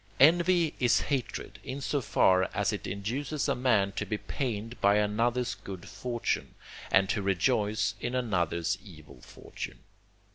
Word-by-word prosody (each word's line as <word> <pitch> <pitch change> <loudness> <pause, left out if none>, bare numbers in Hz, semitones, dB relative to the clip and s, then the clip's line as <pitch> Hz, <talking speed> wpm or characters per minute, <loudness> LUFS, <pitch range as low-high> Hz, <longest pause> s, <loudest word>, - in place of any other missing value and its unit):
Envy 170 +2 +5
is 120 -2 +4
hatred, 135 -4 -3
in 135 +2 -5
so 140 +1 -1
far 95 -5 +3
as - - +1
it - - -4
induces 130 +10 -2
a - - +2
man 110 -6 +2
to - - -3
be 105 - -2
pained 115 -1 -4
by 100 +1 +5
another's 115 +3 +1
good 95 -3 -9
fortune, 120 +5 -3 0.4
and 95 0 +5
to 100 - 0
rejoice 105 +2 +1
in 120 +1 -3
another's 95 -6 0
evil 75 - -14
fortune. - - -9
110 Hz, 145 wpm, -29 LUFS, 95-125 Hz, 0.4 s, Envy